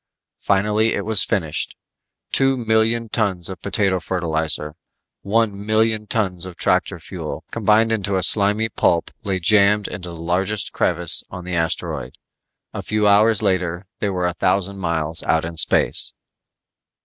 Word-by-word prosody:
Finally 105 Hz, +3 st, +1 dB
it 100 Hz, -, -4 dB
was 110 Hz, -2 st, +6 dB
finished. 80 Hz, -6 st, -1 dB, 0.6 s
Two 135 Hz, 0 st, +2 dB
million 115 Hz, 0 st, +1 dB
tons 95 Hz, -5 st, -2 dB
of 90 Hz, -, -9 dB
potato 100 Hz, -2 st, 0 dB
fertilizer, 80 Hz, -3 st, 0 dB, 0.5 s
one 100 Hz, -1 st, 0 dB
million 110 Hz, 0 st, +1 dB
tons 95 Hz, -6 st, -2 dB
of 90 Hz, -, -10 dB
tractor -, -, 0 dB
fuel -, -, -7 dB
combined 110 Hz, +1 st, +2 dB
into 100 Hz, -3 st, -1 dB
a 95 Hz, -, 0 dB
slimy 105 Hz, +2 st, +5 dB
pulp 85 Hz, -5 st, 0 dB
lay 95 Hz, -3 st, -2 dB
jammed 105 Hz, +2 st, +3 dB
into 90 Hz, -2 st, -7 dB
the 85 Hz, -, -8 dB
largest 90 Hz, +5 st, -2 dB
crevice 85 Hz, -1 st, +1 dB
on 90 Hz, -1 st, -9 dB
the 90 Hz, -, -5 dB
asteroid. 80 Hz, -1 st, -2 dB, 0.6 s
A -, -, -5 dB
few 105 Hz, 0 st, -1 dB
hours 105 Hz, +1 st, +4 dB
later 90 Hz, -2 st, -1 dB
they 100 Hz, -, -1 dB
were 90 Hz, -2 st, -2 dB
a 90 Hz, -, -1 dB
thousand 95 Hz, +2 st, -1 dB
miles 80 Hz, -2 st, -2 dB
out 80 Hz, 0 st, 0 dB
in 85 Hz, 0 st, -6 dB
space. 80 Hz, -, +2 dB
100 Hz, 150 wpm, -20 LUFS, 90-110 Hz, 0.6 s, was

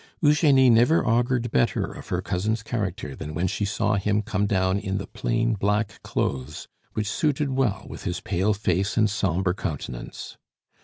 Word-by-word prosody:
Eugenie 145 Hz, -4 st, +5 dB
never 120 Hz, +8 st, +4 dB
augured 120 Hz, 0 st, +1 dB
better 65 Hz, -, +2 dB
of -, -, -10 dB
her -, -, -2 dB
cousin's 110 Hz, +5 st, -1 dB
character 105 Hz, -, -3 dB
than 75 Hz, -1 st, -7 dB
when 85 Hz, +3 st, 0 dB
she 95 Hz, -, -1 dB
saw 100 Hz, +1 st, 0 dB
him 105 Hz, +2 st, +1 dB
come 105 Hz, -2 st, 0 dB
down 95 Hz, -1 st, +1 dB
in 95 Hz, 0 st, -2 dB
the 95 Hz, -, -4 dB
plain 115 Hz, 0 st, 0 dB
black 105 Hz, +1 st, -1 dB
clothes 70 Hz, +3 st, -3 dB, 0.3 s
which 105 Hz, -, -1 dB
suited 145 Hz, +4 st, 0 dB
well 130 Hz, -6 st, 0 dB
with -, -, -9 dB
his 90 Hz, -2 st, -2 dB
pale 100 Hz, +3 st, 0 dB
face 100 Hz, +1 st, 0 dB
and 110 Hz, -2 st, +3 dB
sombre 95 Hz, -3 st, 0 dB
countenance. 70 Hz, -, -6 dB
105 Hz, 165 wpm, -25 LUFS, 95-115 Hz, 0.3 s, Eugenie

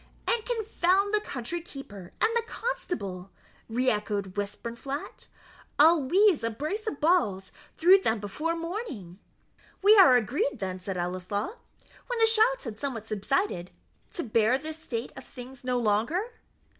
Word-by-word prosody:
"And 470 Hz, -2 st, +1 dB
confound 405 Hz, -4 st, +1 dB
the 425 Hz, -, +4 dB
country 280 Hz, -, -4 dB
keeper 205 Hz, -, -10 dB
and 445 Hz, -, +3 dB
the 470 Hz, -, +3 dB
constable!" 205 Hz, -, -4 dB, 0.4 s
re 250 Hz, +3 st, -1 dB
echoed 205 Hz, -2 st, -2 dB
Westburnflat; 235 Hz, +7 st, -5 dB, 0.5 s
"I'll 320 Hz, +2 st, +6 dB
weize 360 Hz, -, +3 dB
a 230 Hz, -, +1 dB
brace 310 Hz, -, -4 dB
of 290 Hz, -, -3 dB
balls 220 Hz, -, +1 dB, 0.3 s
through 370 Hz, +4 st, +7 dB
them 225 Hz, -, 0 dB
before 300 Hz, +12 st, -3 dB
morning." 330 Hz, -, -6 dB, 0.6 s
"We 420 Hz, +2 st, +8 dB
are 305 Hz, -10 st, +8 dB
agreed, 270 Hz, -, 0 dB
then," 185 Hz, -3 st, -4 dB
said 190 Hz, 0 st, -5 dB
Ellieslaw, 185 Hz, -, -3 dB, 0.5 s
when -, -, -2 dB
the 450 Hz, -, +5 dB
shouts 450 Hz, +3 st, +4 dB
had 220 Hz, -4 st, -7 dB
somewhat 245 Hz, -6 st, -4 dB
subsided, 215 Hz, -, -1 dB, 0.4 s
"to 360 Hz, -, -3 dB
bear 230 Hz, +1 st, +2 dB
this 310 Hz, +2 st, -7 dB
state 240 Hz, -6 st, -5 dB
of -, -, -9 dB
things 255 Hz, 0 st, -11 dB
no 250 Hz, -1 st, 0 dB
longer?" 245 Hz, -, 0 dB
265 Hz, 145 wpm, -28 LUFS, -, 0.6 s, We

